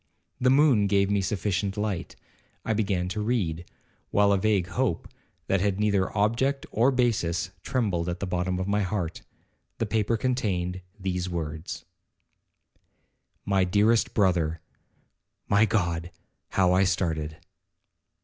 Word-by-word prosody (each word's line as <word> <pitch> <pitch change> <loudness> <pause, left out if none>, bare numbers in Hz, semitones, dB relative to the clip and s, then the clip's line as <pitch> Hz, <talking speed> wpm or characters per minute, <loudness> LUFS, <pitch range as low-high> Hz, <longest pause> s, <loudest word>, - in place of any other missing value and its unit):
The 125 0 +3
moon 135 -7 +5
gave 100 0 +2
me 100 -1 +2
sufficient 95 0 -1
light. 105 -5 -3 0.5
I 110 - +1
began 100 -4 0
to 105 +2 -3
read, 95 -8 -1 0.4
while 100 0 +3
a 100 - +4
vague 100 -3 +2
hope, 120 -6 -1 0.4
that 95 -1 +1
had 100 -1 0
neither 100 -3 +1
object 125 +7 +1
or 120 +5 +3
basis, 105 -9 0
trembled 100 -10 -1
at 85 +1 -3
the 100 - -2
bottom 90 0 -1
of 95 +1 -2
my 105 +1 +1
heart. 95 -4 -2 0.6
The 115 - 0
paper 110 +1 0
contained 95 -7 -1 0.2
these 90 -1 -2
words: 80 -1 -5 1.6
'My 100 -2 +2
dearest 105 +5 +2
brother, 85 -5 +2 0.9
(My 100 +2 +4
God! 85 -5 -1 0.4
how 90 -2 +3
I 95 +1 +4
started!) 80 -4 -1
100 Hz, 130 wpm, -26 LUFS, 90-110 Hz, 1.6 s, moon